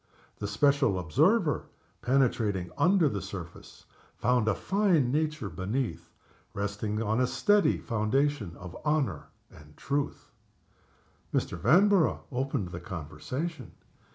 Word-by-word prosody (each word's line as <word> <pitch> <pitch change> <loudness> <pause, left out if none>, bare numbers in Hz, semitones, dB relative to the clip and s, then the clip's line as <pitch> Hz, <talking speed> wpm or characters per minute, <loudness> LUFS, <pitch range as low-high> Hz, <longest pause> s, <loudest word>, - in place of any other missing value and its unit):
The 100 - -3
special 140 0 +2
observer, 85 -4 +2 0.4
penetrating 115 -7 +1
under 180 -2 +4
the 100 -7 -2
surface, 95 -3 -9 0.3
found 125 -2 +2
a 110 - +2
fine 185 -10 +2
nature 150 -4 -1
beneath, 110 +7 -3 0.5
resting 105 +2 -2
on 110 +3 +1
a 125 - +3
steady 205 +9 +3
foundation 120 - -1
of 90 0 -9
honor 150 -2 0 0.3
and 75 0 -16
truth. 140 +1 -3 1.0
Mr. - - -1
Vanborough 175 - +4
opened 130 -6 -2
the 85 - -6
conversation. 110 - -6
120 Hz, 110 wpm, -29 LUFS, 100-145 Hz, 1.0 s, under